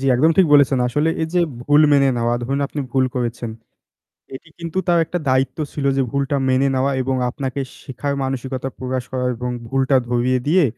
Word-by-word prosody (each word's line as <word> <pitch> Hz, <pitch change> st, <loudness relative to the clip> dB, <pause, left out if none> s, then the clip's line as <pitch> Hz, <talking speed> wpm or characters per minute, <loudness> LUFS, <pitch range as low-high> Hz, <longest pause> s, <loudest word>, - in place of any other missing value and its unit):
জ্বি, 135 Hz, -, -2 dB
একদম 155 Hz, +6 st, +4 dB
ঠিক 190 Hz, -, +6 dB
বলেছেন। 140 Hz, -2 st, +5 dB
আসলে 150 Hz, +6 st, +1 dB
এই 160 Hz, -, -1 dB
যে 180 Hz, -, +4 dB, 0.2 s
ভুল 145 Hz, +3 st, +4 dB
মেনে 140 Hz, -1 st, +5 dB
নেওয়া 120 Hz, 0 st, +1 dB
ধরুন 135 Hz, +3 st, -1 dB
আপনি 145 Hz, -, -5 dB
ভুল 130 Hz, -1 st, +3 dB
করেছেন। 120 Hz, -1 st, -3 dB, 0.9 s
এটি 155 Hz, -, -12 dB
কিন্তু 170 Hz, +1 st, -5 dB
তার 175 Hz, -1 st, +4 dB
একটা 175 Hz, +3 st, -3 dB
দায়িত্ব 130 Hz, 0 st, +1 dB, 0.2 s
ছিল 145 Hz, -, -3 dB
যে 135 Hz, -, +3 dB
ভুলটা 140 Hz, 0 st, 0 dB
মেনে 130 Hz, +2 st, +3 dB
নেওয়া 135 Hz, +2 st, +1 dB
এবং 130 Hz, +1 st, -1 dB
আপনাকে 135 Hz, +1 st, -4 dB, 0.2 s
শেখার 140 Hz, +1 st, -4 dB
মানসিকতা 130 Hz, 0 st, -3 dB
প্রকাশ 130 Hz, -1 st, -3 dB
করা 130 Hz, -1 st, -2 dB
এবং 125 Hz, +1 st, -4 dB, 0.2 s
ভুলটা 135 Hz, +1 st, +1 dB
ধরিয়ে 125 Hz, +1 st, +1 dB
দিয়ে 175 Hz, +4 st, +4 dB
135 Hz, 190 wpm, -20 LUFS, 130-145 Hz, 0.9 s, ঠিক